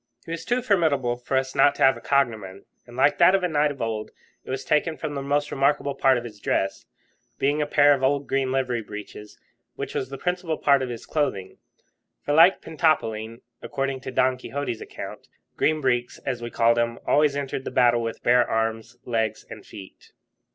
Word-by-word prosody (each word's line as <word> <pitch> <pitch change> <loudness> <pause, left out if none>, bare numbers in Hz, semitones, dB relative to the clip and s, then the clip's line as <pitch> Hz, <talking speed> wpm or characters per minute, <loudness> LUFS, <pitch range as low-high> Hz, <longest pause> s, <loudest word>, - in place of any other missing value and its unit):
He 165 - -8
was 165 -1 -5
too 245 0 0
formidable 155 - +1
to 125 +2 -3
us 130 0 -1
not 140 +1 +4
to - - 0
have 135 0 +6
a - - -11
cognomen, 110 -9 -1 0.2
and, 120 +1 -12
like 145 +2 +3
that 180 +2 +6
of 195 - 0
a - - +2
knight 150 -2 +2
of 140 -4 -5
old, 110 -1 -3 0.3
it - - -14
was 130 +1 -4
taken 155 +2 +1
from 155 -2 -5
the 140 - -4
most 145 +1 -1
remarkable 140 +1 +1
part 135 -1 +3
of 120 - -4
his 110 -3 -10
dress, 95 -1 -2 0.5
being 145 +2 +1
a 150 - -1
pair 145 0 +5
of 135 - -2
old 140 +1 +1
green 135 -1 -1
livery 130 -3 -1
breeches, 105 0 -10 0.4
which - - -5
was 130 - -3
the 135 - -7
principal 180 0 -2
part 140 -2 +3
of 130 - -3
his 120 -1 -7
clothing; 100 -12 -2 0.6
for, 145 - -1
like 170 +5 +6
Pentapolin, 115 -9 -1 0.2
according 135 -2 -3
to - - -6
Don 130 0 +1
Quixote's 135 -2 -5
account, - - -9 0.3
Green 155 0 +1
Breeks, 125 -2 0
as 125 -3 -3
we 120 - -5
called 115 0 +2
him, 115 0 -1
always 145 -1 +3
entered 135 -2 -3
the - - -4
battle 120 -1 +3
with 115 -1 -5
bare 125 0 +4
arms, 115 +1 -2
legs, 115 -2 -2
and - - -9
feet. 100 -3 -13
135 Hz, 205 wpm, -24 LUFS, 120-145 Hz, 0.6 s, have